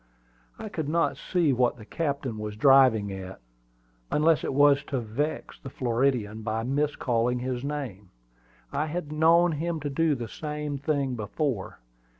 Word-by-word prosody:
I - - -6
could 160 -8 -4
not 165 +2 +1
see 170 -6 +1
what 125 -1 +1
the 110 - -12
captain 140 -6 -3
was 105 0 -5
driving 125 -4 +5
at, 95 0 -8 0.7
unless 160 +1 +3
it - - -1
was 140 0 +5
to 135 - -2
vex 125 +7 -3
the 135 - -8
Floridian 120 -4 0
by 110 +1 -2
miscalling 125 -3 0
his 125 0 -3
name. 130 -10 -5 0.6
I 150 - 0
had 155 -1 -4
known 165 +3 +4
him 165 +2 -2
to 145 0 -3
do 160 +1 +2
the 120 -3 -5
same 150 +1 -4
thing 140 -2 0
before. 110 0 -3
135 Hz, 155 wpm, -27 LUFS, 115-150 Hz, 0.7 s, driving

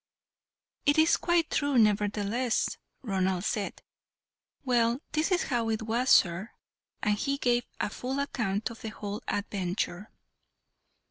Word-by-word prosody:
"It 290 - +4
is 315 +1 +5
quite 345 -2 +1
true, 285 -2 +1
nevertheless," 210 +2 +1 0.3
Ronald 190 -4 0
said. 205 -2 -2 0.8
"Well, 240 -1 +2
this 310 +3 +1
is 365 0 +3
how 235 -4 -1
it 220 0 -1
was, 235 +4 0
sir," 180 +5 +4 0.5
and 210 0 +3
he 275 +6 -1
gave 245 -2 +1
a - - -1
full 260 +5 -4
account 225 -6 -1
of 230 - -11
the 220 - -4
whole 205 -1 -6
adventure. 195 -1 -2
225 Hz, 130 wpm, -29 LUFS, 205-255 Hz, 0.8 s, is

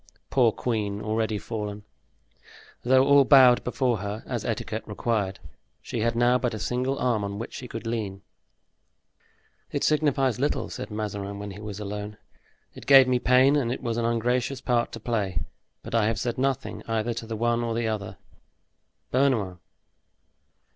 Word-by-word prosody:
Poor 120 -4 +4
queen, 105 -4 -2
already 110 0 -1
fallen! 105 -1 -5 1.0
Though 130 +2 +4
all 140 0 +6
bowed 130 -3 +6
before 125 -1 0
her, 100 +2 -5
as 120 -4 -3
etiquette 110 -1 -3
required, 105 -2 -1 0.4
she 120 - -5
had 115 +1 0
now 120 +1 +3
but 125 -3 -1
a - - -5
single 130 +4 -1
arm 120 -5 0
on 100 0 -4
which 115 - -6
she 125 - -7
could 115 -1 -7
lean. 105 -4 -3 1.5
"It - - -2
signifies 140 -6 +2
little," 145 +3 -1
said - - -6
Mazarin, 100 -2 -4
when 100 0 -6
he 95 - -10
was 105 -1 -7
alone. 105 0 -5 0.6
"It - - -12
gave 135 -2 +8
me 125 -1 +2
pain 130 +3 +4
and 125 -5 +1
it 130 - -4
was 115 -2 -2
an 115 - 0
ungracious 120 +3 0
part 120 -2 0
to 115 - -6
play, 100 -8 -2 0.4
but - - -8
I 115 -2 +3
have 110 -3 -1
said 120 +2 -2
nothing 135 -1 -1
either 115 +1 -1
to 115 0 -6
the 110 -1 -4
one 120 +1 +1
or 115 -1 -2
to - - 0
the 115 - -1
other. 105 -3 -4 0.9
Bernouin!" 120 -9 +1
115 Hz, 170 wpm, -26 LUFS, 105-125 Hz, 1.5 s, gave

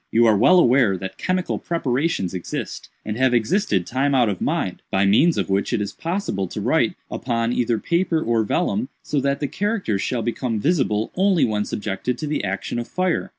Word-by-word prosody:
You 115 +1 +4
are 110 -2 +5
well 185 - +5
aware 120 - +4
that 95 +1 -7
chemical 185 0 -1
preparations 140 - -1
exist, 90 -2 -5 0.2
and 105 +1 -3
have 130 -1 +3
existed 115 - +1
time 135 +3 0
out 120 -4 +4
of 95 -4 -4
mind, - - -1
by 95 +1 +2
means 140 - +4
of - - 0
which 100 +1 0
it - - +1
is 100 -1 -3
possible 165 - -2
to - - -6
write - - +1 0.2
upon 115 -1 -1
either 120 -2 +1
paper 170 - 0
or 115 -6 +1
vellum, 200 - -1
so 145 - -1
that 140 +1 0
the 145 - -1
characters 195 - -1
shall 120 +1 -1
become 120 -1 -2
visible 115 - +1
only 190 -3 +3
when 105 -2 -1
subjected 105 +4 -3
to 155 - -4
the 150 -5 -2
action 95 +4 -3
of 120 - -5
fire. 185 -2 -1
120 Hz, 195 wpm, -22 LUFS, 105-165 Hz, 0.2 s, are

